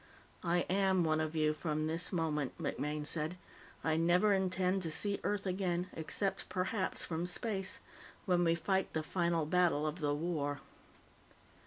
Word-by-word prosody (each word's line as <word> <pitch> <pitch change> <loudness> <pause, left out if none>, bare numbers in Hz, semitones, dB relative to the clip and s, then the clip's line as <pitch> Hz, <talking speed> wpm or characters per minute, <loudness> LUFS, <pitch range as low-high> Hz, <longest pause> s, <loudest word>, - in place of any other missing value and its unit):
"I 175 0 +2
am 190 -1 +2
one 155 -1 +2
of 155 +1 -3
you 155 -1 +2
from 155 -1 -2
this 165 +3 0
moment," 155 -6 -1
MacMaine 150 0 -2
said. 160 +3 +1 0.5
"I 160 -1 +2
never 180 +5 +4
intend 190 0 +1
to 165 - 0
see 200 +5 0
Earth 205 -1 -1
again, 180 -1 -1
except, 190 +5 -2
perhaps, 185 +1 0
from 165 +1 -2
space 195 +1 -1 0.5
when 180 -3 +3
we 165 -1 +3
fight 190 +2 0
the 155 - -1
final 170 -1 0
battle 165 -2 +2
of 155 +3 -2
the 145 -2 +1
war." 145 -3 -2
175 Hz, 155 wpm, -34 LUFS, 155-185 Hz, 0.5 s, never